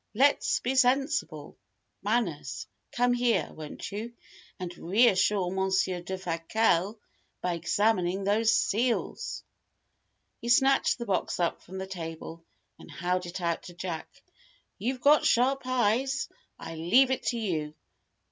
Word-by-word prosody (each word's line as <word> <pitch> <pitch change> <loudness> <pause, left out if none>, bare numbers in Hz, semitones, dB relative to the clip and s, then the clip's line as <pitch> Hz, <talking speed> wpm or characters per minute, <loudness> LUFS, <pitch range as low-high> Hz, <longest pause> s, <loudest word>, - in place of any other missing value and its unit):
Let's 280 +5 +3
be 255 - -1
sensible! 260 - +1 0.4
Manners, 180 - -1 0.3
come 245 0 +2
here, 240 -8 +1
won't 155 -1 -8
you, 220 +4 -5 0.5
and 180 -1 -5
reassure 195 -1 +3
Monsier 190 -1 0
Defasquelle 185 +3 0 0.5
by 180 - 0
examining 185 +2 +1
these 215 +3 +3
seals!" 230 +2 0 1.0
He 235 - -5
snatched 270 +3 +4
the 235 - -5
box 195 -4 -1
up 170 -1 0
from 190 +2 -10
the 190 - -4
table, 165 -2 -7 0.4
and - - -13
held 180 0 -2
it 180 +2 -6
out 170 -1 -1
to 175 - -13
Jack. 175 -2 -5 0.7
"You've 250 +3 -2
got 295 +3 +5
sharp 265 +3 +3
eyes. 255 +2 +1 0.3
I - - -8
leave 195 +12 +4
it 260 - 0
to 240 - 0
you. 160 -9 -2
195 Hz, 130 wpm, -28 LUFS, 175-245 Hz, 1.0 s, got